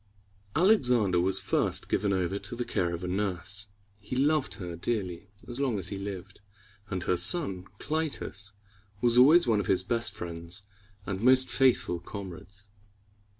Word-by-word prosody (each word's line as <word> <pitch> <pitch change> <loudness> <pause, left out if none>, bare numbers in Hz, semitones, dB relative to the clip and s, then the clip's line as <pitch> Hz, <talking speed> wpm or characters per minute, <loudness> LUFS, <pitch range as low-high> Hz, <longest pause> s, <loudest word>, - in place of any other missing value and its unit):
Alexander 125 - +3
was 95 +2 +2
first - - 0
given 100 -1 0
over 95 +1 -1
to 120 - -7
the 120 0 -3
care 85 -2 -1
of 85 +1 -5
a - - -3
nurse. 95 +1 -2 0.3
He 105 +5 -6
loved 145 +2 +1
her 90 -5 -6
dearly 95 0 -3 0.2
as 120 +1 -4
long 130 -6 0
as 95 -1 +4
he 100 - -5
lived, 100 0 -7 0.5
and 95 -2 -3
her 90 - +1
son 90 - +2
Cly´tus 150 -10 -3 0.5
was 120 +2 +4
always 155 +7 +7
one 115 -4 +2
of 100 - -3
his 95 -1 +2
best 115 0 -1
friends 85 0 -6 0.4
and 95 -1 -4
most 130 +2 +5
faithful 130 -9 +2
comrades. 100 +2 -10
100 Hz, 155 wpm, -28 LUFS, 90-120 Hz, 0.5 s, always